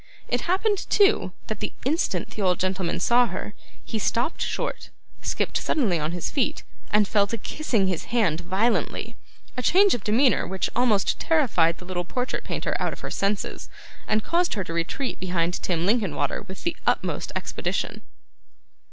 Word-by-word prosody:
It 245 0 0
happened, 405 +2 +1
too, 410 0 +4
that - - -4
the - - -3
instant 315 +7 0
the 215 - -5
old 180 -2 +2
gentleman 185 -2 -1
saw 240 +6 +4
her, 210 - -5 0.3
he 225 - -3
stopped 235 - 0
short, - - -2 0.3
skipped - - -1
suddenly 210 - +1
on 155 +1 -1
his 175 -1 -3
feet, 270 -5 0 0.3
and 210 -1 +4
fell 200 -1 +3
to 230 - -3
kissing 230 -7 0
his 185 -4 -1
hand 210 -10 +1
violently: 190 +7 0 0.4
a 250 - -2
change 385 +8 +5
of 235 - -2
demeanour 245 +5 +3
which 190 0 -2
almost 230 -5 +2
terrified 205 - +3
the 180 - -12
little 180 -1 -2
portrait 250 +8 -3
painter - - -2
out - - 0
of - - -11
her - - -5
senses, 200 +1 -2 0.4
and 215 0 +2
caused 345 -3 +1
her 200 - -1
to 165 - -6
retreat 170 +11 -2
behind 180 -1 -1
Tim 170 -2 0
Linkinwater 200 -6 +1
with 190 -2 -9
the 340 -1 -1
utmost - - 0
expedition. - - -2
210 Hz, 170 wpm, -25 LUFS, 180-250 Hz, 0.4 s, change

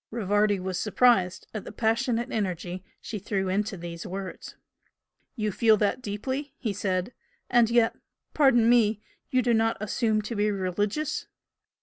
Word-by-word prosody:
'" - - -67
Rivardi 205 -2 +1
was 185 -1 -3
surprised 210 -5 +3
at 215 - -4
the - - -8
passionate 230 +1 0
energy 185 -3 -3 0.2
she 215 - -5
threw 195 -1 -2
into 200 +1 -1
these 170 -1 -7
words. 190 +1 -7 0.8
"You 215 -4 -1
feel 220 +2 +4
that 210 +4 0
deeply?" 260 +6 -4
he 220 -5 -2
said 190 +2 -2 0.4
"And 240 -2 +5
yet 235 -1 +3 0.4
pardon 255 -6 +4
me! 225 -3 +4 0.3
you 255 -1 +2
do 240 0 +2
not 225 0 +2
assume 215 +1 0
to 230 +3 -5
be 210 0 +2
religious?" 205 - -2
215 Hz, 150 wpm, -27 LUFS, 195-235 Hz, 0.8 s, And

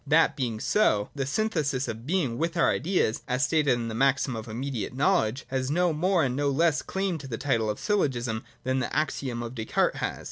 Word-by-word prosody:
That 160 +3 +4
being 120 -5 -2
so, 105 - +2
the 135 -2 -3
synthesis 150 - 0
of 115 +3 -6
being 145 -9 0
with 165 +1 -1
our 165 - +4
ideas, 175 - 0
as 125 +3 +1
stated 150 -4 +2
in 120 -1 -2
the 115 - -4
maxim 135 +1 +2
of 110 0 -6
immediate 120 0 -4
knowledge, 135 - +1
has 130 0 -1
no 175 +2 +2
more 175 +2 +2
and 125 -2 0
no 145 +1 +1
less 150 +2 +2
claim 190 -3 -2
to 140 - -8
the 115 -3 -4
title 115 -5 0
of 105 - -3
syllogism 125 - 0 0.2
than 130 +1 0
the 130 - -2
axiom 130 -5 -1
of 115 +1 -6
Descartes 110 -3 0
has. - - -3
135 Hz, 210 wpm, -27 LUFS, 120-160 Hz, 0.2 s, That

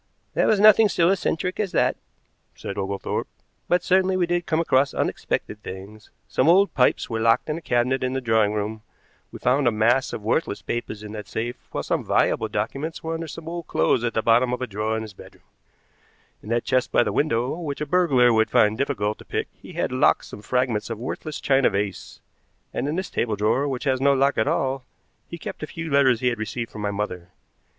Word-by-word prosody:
"There - - +2
was 215 - +3
nothing 215 +1 +7
so 170 -2 +3
eccentric 180 -1 -1
as 200 -4 -1
that," - - +2 0.6
said 100 - -6
Oglethorpe, 100 0 -3 0.4
"but 180 - +2
certainly 185 0 +2
we 180 - +2
did 175 0 -1
come 160 -1 +1
across 140 -4 +2
unexpected 105 - -2
things. 100 +3 -10 0.2
Some 130 - +2
old 195 +4 +5
pipes 125 - +2
were 115 -1 -3
locked 115 +6 +2
in 155 - -1
a - - -19
cabinet 125 -1 0
in 130 0 -1
the 135 - 0
drawing 110 -4 +2
room. 105 +1 -3 0.5
We - - -8
found 130 +2 +2
a - - +4
mass 115 +4 +2
of 105 - -6
worthless 110 0 -1
papers 110 -3 -4
in 105 - -8
that 105 -1 -7
safe, 120 +2 -5
while - - -4
some - - -1
valuable - - +1
documents 155 +4 -4
were 165 0 -3
under 165 0 -4
some 160 +2 -9
old 170 -1 -5
clothes 80 +9 +1
at 115 -2 -1
the 110 - +1
bottom 120 +2 +4
of 125 - -3
a - - 0
drawer 110 0 -2
in 110 - -3
his 110 -2 -9
bedroom. - - -15 1.0
In 105 - -11
that 115 0 +1
chest 130 -1 +1
by - - +4
the - - -2
window, 125 -3 0
which 145 -5 -4
a 150 - -2
burglar 140 -8 +4
would 110 0 +3
find 105 +1 +3
difficult 105 -7 -1
to - - -13
pick, - - -3
he - - -13
had - - -1
locked - - +3
some 105 - -10
fragments 120 -1 -1
of 115 - -4
a - - -12
worthless 150 +3 -5
china 135 -1 +3
vase, 100 -2 -4 0.5
and - - -2
in 150 - -1
this 185 0 -3
table 110 -3 -1
drawer, 110 +7 +1
which 130 -3 -3
has 130 -2 0
no 140 0 +5
lock 135 -1 +2
at 110 - +2
all, 135 0 0 0.4
he 170 - -7
kept - - -7
the 155 - -5
few 165 -1 -6
letters 130 -4 +4
he 125 - +3
had 120 -2 -4
received 115 +2 -4
from 105 - -8
my 105 - -1
mother. 100 -4 -4
125 Hz, 220 wpm, -24 LUFS, 110-155 Hz, 1.0 s, nothing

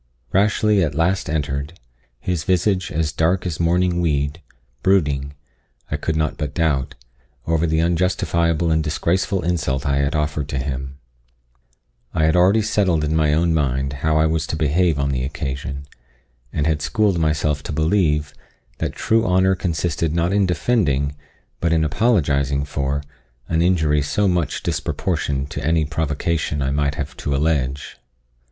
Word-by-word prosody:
Rashleigh 105 +1 +3
at 75 -3 -2
last 85 +2 +1
entered, 75 +1 -2 0.4
his 85 +2 -2
visage 95 +1 +1
as 80 -1 0
dark 85 +5 +1
as 85 -4 -3
mourning 85 +1 +2
weed 75 -1 0 0.4
brooding, 70 -7 +1 0.6
I - - 0
could 80 - -2
not 80 -2 -1
but 75 -2 -4
doubt, 70 -4 0 0.5
over 80 +1 +1
the 80 0 +1
unjustifiable 85 -1 +1
and 80 0 +2
disgraceful 85 +4 0
insult 75 -5 -1
I 70 -1 +1
had 70 +2 0
offered 75 -1 -1
to 70 - -2
him. 65 0 -4 1.2
I 80 - +2
had 80 +1 +3
already 95 +5 +4
settled 95 -7 +1
in 75 +1 0
my 75 -2 +3
own 85 +1 +2
mind 70 -3 0
how 80 0 +2
I 80 - +4
was 80 -1 0
to - - -2
behave 80 +1 +2
on 70 0 0
the 65 -2 -1
occasion, 70 0 -4 0.7
and 75 - -1
had 80 -2 +1
schooled 105 0 +1
myself 75 -2 0
to - - -6
believe, 80 -2 +1 0.5
that - - -2
true 115 0 +1
honour 95 +1 +3
consisted 85 -3 -1
not 85 +2 +1
in 100 -2 +3
defending, 75 - +1 0.4
but 85 - 0
in 80 -1 +3
apologising 70 - +1
for, 70 0 -2 0.4
an 80 0 +1
injury 80 -4 +2
so 100 +8 +1
much 90 -6 -1
disproportioned 70 0 -2
to - - -5
any 80 +1 +2
provocation 80 0 -1
I 65 - 0
might 70 0 0
have 70 -2 -5
to 70 - -2
allege. 70 -2 -1
80 Hz, 155 wpm, -21 LUFS, 70-85 Hz, 1.2 s, already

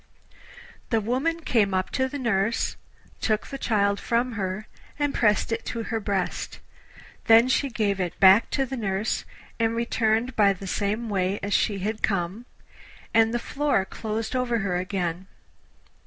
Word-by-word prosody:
The 225 - +2
woman 265 +10 -1
came 210 -10 +2
up 185 0 -1
to 260 0 0
the 285 - -5
nurse, 225 -4 0 0.4
took 215 -2 0
the 275 - -7
child 200 -2 +1
from 240 +2 0
her, 200 -1 -3 0.3
and 290 -1 0
pressed 210 0 +2
it 230 0 -1
to 230 - -3
her 225 0 -2
breast; 200 -3 -2 0.7
then 230 +1 +7
she 275 +2 +1
gave 210 -4 0
it 180 -2 -3
back 195 +3 +7
to 270 - 0
the 265 +1 -5
nurse 200 -1 -1 0.3
and 225 0 +1
returned 230 +1 0
by 200 -2 +5
the 195 +1 -9
same 210 +4 -1
way 195 -1 0
as 200 0 -1
she 205 - +2
had 215 +3 -3
come, 195 +4 -1 0.7
and 225 0 +4
the 240 - 0
floor 275 -4 0
closed 220 +4 -4
over 250 -2 +1
her 180 -2 0
again. 180 -1 -3
220 Hz, 160 wpm, -25 LUFS, 195-235 Hz, 0.7 s, then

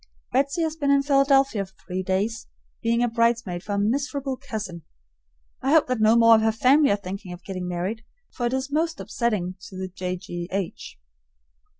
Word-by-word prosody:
Betsy 275 +5 +1
has 315 -1 -1
been 285 -3 -1
in 280 0 +4
Philadelphia 275 -5 +3
for 190 0 -15
three 185 0 -3
days, 200 +4 -1 0.3
being 235 +1 +2
a - - +3
bridesmaid 230 -6 0
for 205 - -5
a - - 0
miserable 270 +5 -1
cousin. 215 -10 -6 0.8
I 270 +3 +1
hope 320 - +6
that 250 -3 -1
no 220 +1 +5
more 230 -1 +7
of 220 - +5
her 220 0 +3
family 270 +6 +4
are 200 - +4
thinking 195 -1 -7
of 175 0 -11
getting 185 -2 -5
married, 185 +6 -3 0.3
for 240 - -2
it's 265 +3 -2
most 325 +2 0
upsetting 200 -6 -2
to 190 - -10
the 185 0 -4
J. 180 0 -4
G. 175 -1 -6
H. 190 -2 -4
225 Hz, 190 wpm, -24 LUFS, 190-270 Hz, 0.8 s, more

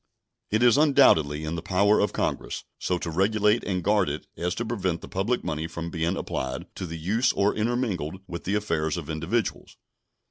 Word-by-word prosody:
It 110 +3 +2
is 120 +2 +6
undoubtedly 80 - +4
in 80 +1 -3
the 85 - -3
power 100 +4 +3
of 105 - +2
Congress - - -2 0.2
so 90 - 0
to 85 -1 -4
regulate 105 +5 +2
and 90 -3 -2
guard 100 -4 +3
it 75 +2 -5
as 90 +1 -2
to 120 - -3
prevent 95 -7 -2
the - - -9
public 105 +7 -1
money 80 +1 -2
from 85 +1 -6
being 85 +2 -1
applied 65 0 -3
to 95 - -4
the 85 0 -6
use 110 +10 +1
or 100 +1 +2
intermingled 105 - -1
with 85 -2 -7
the 100 - 0
affairs 80 -7 0
of 80 -2 -5
individuals. 85 +9 -2
95 Hz, 190 wpm, -26 LUFS, 80-105 Hz, 0.2 s, is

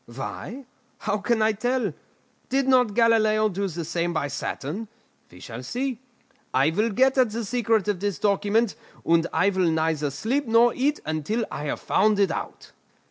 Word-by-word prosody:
Why? 185 - -7 0.3
How 205 - -2
can 220 +1 +1
I 220 - +4
tell? 235 - -1 0.6
Did 270 0 +1
not 250 -5 +3
Galileo 215 -2 +3
do 200 +1 -2
the 170 -2 -5
same 170 +1 -1
by 145 -3 -1
Saturn? 150 +9 -4 0.4
We 90 - -15
shall 115 +5 -8
see. 245 - -3 0.6
I 135 +4 +4
will 210 +7 +1
get 260 +5 +3
at 250 -3 +4
the 225 +1 -4
secret 225 -2 +1
of 205 -4 0
this 200 -1 -2
document, 205 +2 +1 0.3
and 165 0 +3
I 180 +5 +2
will 185 -3 +1
neither 160 -2 0
sleep 235 - -2
nor 230 +1 +5
eat 285 +3 0
until 155 +9 -1
I 150 - -5
have 145 - -3
found 210 +1 +2
it 195 -4 +3
out." - - -6
210 Hz, 175 wpm, -25 LUFS, 165-235 Hz, 0.6 s, nor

